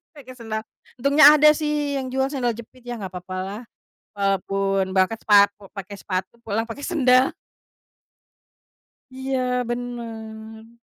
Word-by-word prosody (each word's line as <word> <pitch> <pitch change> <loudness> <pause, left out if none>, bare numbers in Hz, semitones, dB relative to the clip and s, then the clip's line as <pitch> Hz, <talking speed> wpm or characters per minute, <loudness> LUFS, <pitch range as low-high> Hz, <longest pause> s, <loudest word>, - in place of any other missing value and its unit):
pake 255 -3 -12
sendal, 220 -2 -4 0.4
untungnya 285 +3 +7
ada 305 0 +6
sih 295 -2 -1
yang 260 -1 -4
jual 265 0 +1
sendal 250 -4 -1
jepit 235 +2 -13
ya 240 -2 -6
nggak 190 - -4
papa 185 0 -7
lah, 200 +5 -6 0.5
walaupun 195 -1 0
berangkat 190 +4 +2
sepatu, 200 -1 +4
pakai 200 +1 -7
sepatu 185 +2 -4
pulang 225 0 -2
pakai 230 +5 -8
sendal. 260 -5 +3 1.8
Iya 255 -1 -1
bener. 225 -2 -7
230 Hz, 125 wpm, -23 LUFS, 200-260 Hz, 1.8 s, untungnya